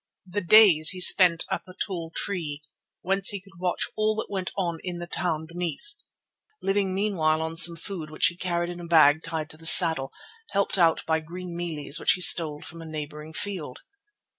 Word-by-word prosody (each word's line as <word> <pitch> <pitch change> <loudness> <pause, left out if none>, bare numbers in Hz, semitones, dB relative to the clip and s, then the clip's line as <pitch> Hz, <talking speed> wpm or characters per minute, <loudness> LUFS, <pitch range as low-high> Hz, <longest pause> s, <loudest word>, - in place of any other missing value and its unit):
The 195 +3 -4
days 180 -5 +5
he 185 - -3
spent 180 -2 +6
up - - -5
a 185 - -14
tall 175 -5 -5
tree, 155 -7 -3 0.4
whence 195 +1 +2
he 200 - -1
could 190 -1 -20
watch 180 -1 -2
all 215 0 -1
that 215 - -6
went 190 -2 -4
on 170 -4 -3
in 180 -2 -6
the 175 - -7
town 170 -3 -3
beneath, 175 - -6 0.7
living 195 -1 -2
meanwhile 175 -6 -1
on 160 0 -5
some 170 +1 +5
food 165 -2 -8
which 155 - -1
he 175 - 0
carried 175 -1 -3
in 175 - -10
a 170 - -10
bag 160 -2 +4
tied 160 -2 -6
to 155 - -6
the 165 - -13
saddle, 160 -6 +6 0.4
helped 200 -1 -2
out 165 -2 +1
by 160 0 -1
green 175 +2 -10
mealies 160 -3 -4
which - - +2
he 180 - -6
stole 155 -4 +4
from 165 0 -11
a - - -10
neighbouring 150 0 -8
field. 170 -9 -6
170 Hz, 195 wpm, -24 LUFS, 160-185 Hz, 0.7 s, spent